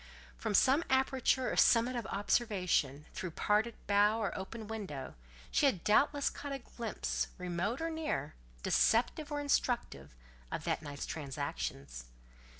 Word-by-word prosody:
From 205 - -2
some 270 - +5
aperture 265 -1 +2
or - - -2
summit 240 +2 +4
of 235 -5 -3
observation, 180 - 0
through 185 - -4
parted 215 +3 +2
bough 205 +2 +4
or 215 - -2
open 210 +3 -6
window, 190 -12 -5 0.4
she 290 - +4
had 190 -11 0
doubtless 285 +6 +3
caught 285 - -7
a 275 - -2
glimpse, 235 -3 -3
remote 180 +6 -2
or 330 0 -1
near, 305 - -2 0.3
deceptive 255 +6 +2
or 290 - -1
instructive, 250 - -1 0.4
of - - -3
that - - -1
night's 145 -2 -6
transactions. 135 - -5
215 Hz, 140 wpm, -33 LUFS, 175-260 Hz, 0.4 s, some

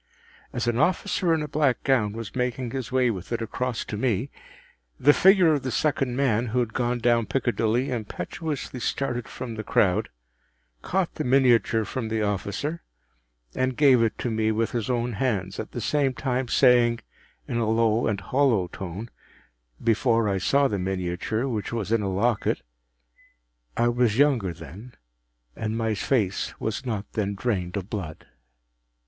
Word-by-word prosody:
As 120 -2 -2
an 120 0 0
officer 180 +2 +1
in 160 -2 +2
a - - -4
black 145 -3 +1
gown 120 -7 +2
was 115 0 -7
making 125 -1 -2
his 130 -2 -4
way 130 -2 +3
with 95 -1 -7
it 120 - 0
across 120 +1 -3
to - - -5
me, 115 +2 -1 0.7
the 145 +2 +6
figure 185 -3 +5
of 145 - 0
the 130 - -3
second 135 -2 0
man 125 -3 +1
who 120 +3 0
had 120 -2 -1
gone 120 0 0
down 120 -1 +2
Piccadilly 120 0 0
impetuously 125 - -4
started 120 -1 -2
from 125 -3 -6
the 110 -1 -5
crowd, 95 -3 +2 0.7
caught 190 -2 -1
the 155 - -3
miniature 125 -4 +3
from 115 +3 -4
the 110 -1 0
officer, 105 - -2 0.7
and 130 -1 -1
gave 135 -5 +6
it 115 -1 +1
to 120 - -2
me 110 0 +1
with 110 +1 0
his 115 -2 -2
own 120 -1 0
hands, 100 -5 -1
at 110 - -5
the - - -5
same 135 +3 +1
time 130 -1 -1
saying, 120 -2 +4 0.5
in 120 - -2
a 115 -2 0
low 115 0 +2
and 100 -3 -1
hollow 115 -3 +2
tone,—before 105 - -3
I 100 -1 0
saw 140 +8 +3
the 100 -6 -2
miniature, 95 +6 -2
which 110 -5 -3
was 115 -3 -3
in 115 -1 +3
a 100 - -1
locket,—“_I - - -3
was 120 -3 +2
younger 130 -10 +3
then_, 85 - -11 0.6
and 110 0 -3
my 110 -1 0
face 105 -2 -1
was 110 +4 -3
not 105 -4 -2
then 100 -2 -1
drained 95 -4 -2
of 95 +1 -6
blood. 90 -8 -5
115 Hz, 165 wpm, -25 LUFS, 105-130 Hz, 0.7 s, the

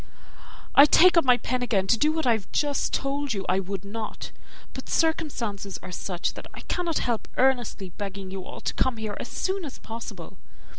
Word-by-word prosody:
I 280 - +10
take 360 +5 +7
up 335 - +6
my 250 -2 +5
pen 255 0 -2
again 220 -6 +1
to 210 - +4
do, 300 +7 +2
what 320 -1 -1
I 245 - +5
have 220 -4 -1
just 290 -1 0
told 275 -2 -1
you 195 -1 -3
I 185 - +2
would 195 0 -5
not; 215 +2 -6 0.4
but - - -8
circumstances 240 - -1
are - - -7
such, 180 0 -2
that - - -9
I - - -8
cannot 345 -3 -1
help 235 -3 -1
earnestly 245 -8 +1
begging 195 -1 -6
you 190 -1 -5
all - - -9
to - - -2
come 260 -3 +1
here 215 -2 -4
as - - -5
soon 380 0 -2
as 285 -5 -7
possible. 225 +1 -8
235 Hz, 200 wpm, -26 LUFS, 200-285 Hz, 0.4 s, I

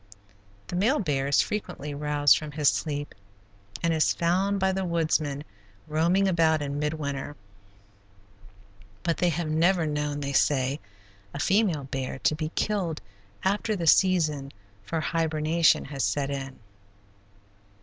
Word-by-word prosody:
The - - -6
male 225 +11 +2
bear 140 - -1
is 140 - +4
frequently 175 -8 -4
roused 145 0 +3
from 150 -1 -5
his 145 -1 +3
sleep 145 -2 -3 0.7
and 165 -1 +2
is 160 -1 +2
found 190 +4 +1
by 190 0 +2
the 190 0 -2
woodsman 155 -4 0 0.4
roaming 170 +6 +2
about 165 -3 +3
in 140 0 -3
mid 150 +1 -1
winter, 145 -1 -4 1.7
but 170 -1 0
they 180 - +2
have 170 0 -2
never 170 +2 +3
known, 150 -1 -2
they 140 0 -3
say, 135 0 +2 0.6
a - - -4
female 185 -4 +2
bear 130 -1 -4
to 145 - +1
be 155 0 -3
killed 185 -7 -1 0.4
after 210 +3 0
the 175 -4 -3
season 155 -6 +3 0.3
for 160 +11 -3
hibernation 160 0 +2
has 140 -2 -4
set 140 +2 0
in. 135 -1 -5
155 Hz, 140 wpm, -26 LUFS, 145-175 Hz, 1.7 s, is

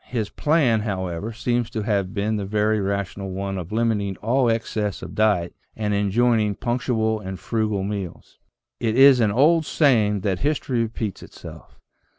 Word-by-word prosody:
His 110 -5 -3
plan, 145 -8 +2
however, 95 -1 -3
seems 120 +1 -1
to 110 - -4
have 100 -3 0
been 105 +1 -1
the 100 - -3
very 105 +1 +1
rational 100 0 -3
one 95 0 -4
of 90 +1 -8
limiting 105 -4 0
all 120 +3 +1
excess 110 -3 -2
of - - -8
diet 105 -6 +1 0.2
and 105 -1 -2
enjoining 105 +1 +2
punctual 115 -2 -1
and 95 -2 -7
frugal 110 -4 -1
meals." 100 -4 -6 0.4
It 115 -1 0
is 135 -1 +7
an 110 -3 +3
old 155 +9 +4
saying 110 - +2
that 95 -2 -1
history 140 -4 0
repeats 110 -3 -4
itself. - - -12
110 Hz, 160 wpm, -23 LUFS, 100-115 Hz, 0.4 s, is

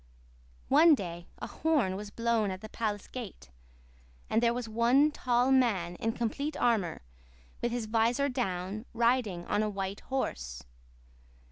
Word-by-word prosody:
One 310 +3 +7
day 175 -6 -6
a - - -5
horn 290 -12 0
was 205 +1 -6
blown 230 -1 0
at 185 0 -5
the 215 - -8
palace 210 -3 -3
gate; 220 - -8 0.8
and 225 - +3
there 235 -1 +4
was 240 -1 -3
one 240 +7 +4
tall 250 -2 +1
man 215 -10 +2
in 225 0 -1
complete 280 +7 -2
armor 205 - +1 0.6
with 240 - 0
his 240 -2 -2
visor 230 +5 +2
down, 210 -4 -3
riding 230 -7 +1
on 205 - +1
a 215 - 0
white 195 -1 -4
horse. 60 - -4
225 Hz, 145 wpm, -30 LUFS, 195-245 Hz, 0.8 s, One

